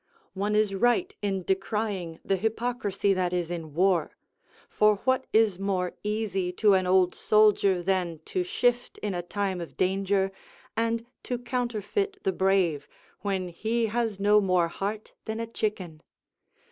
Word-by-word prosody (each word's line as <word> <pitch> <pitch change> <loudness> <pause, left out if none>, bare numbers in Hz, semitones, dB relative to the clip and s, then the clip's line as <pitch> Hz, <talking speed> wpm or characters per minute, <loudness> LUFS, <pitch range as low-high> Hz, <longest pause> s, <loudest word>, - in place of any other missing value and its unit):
One 205 +2 -1
is 210 -2 +2
right 245 - +2
in 195 -2 -1
decrying 190 -3 -2
the 195 - +2
hypocrisy 220 -2 0
that 180 -1 0
is 175 -1 -1
in 160 -4 -6
war; 180 -1 +2 0.5
for 210 0 +3
what 260 0 +2
is 215 -4 +3
more 190 -2 -1
easy 210 -4 -1
to 205 +2 +4
an 185 -1 +2
old 185 -1 +4
soldier 205 -4 +3
than 180 -3 0
to 370 - -1
shift 245 -8 0
in 205 -2 -1
a 175 - -2
time 190 0 -2
of 170 - -9
danger, 195 +1 +1 0.4
and 230 0 0 0.2
to 250 - -3
counterfeit 245 - -2
the 190 - +2
brave 190 -6 +1 0.3
when 190 -2 -2
he 225 +7 -1
has 225 -4 -1
no 210 +1 +5
more 180 -3 +2
heart 205 +5 -4
than 220 +1 -3
a 230 - -2
chicken? 195 -8 -4
200 Hz, 150 wpm, -27 LUFS, 185-220 Hz, 0.5 s, no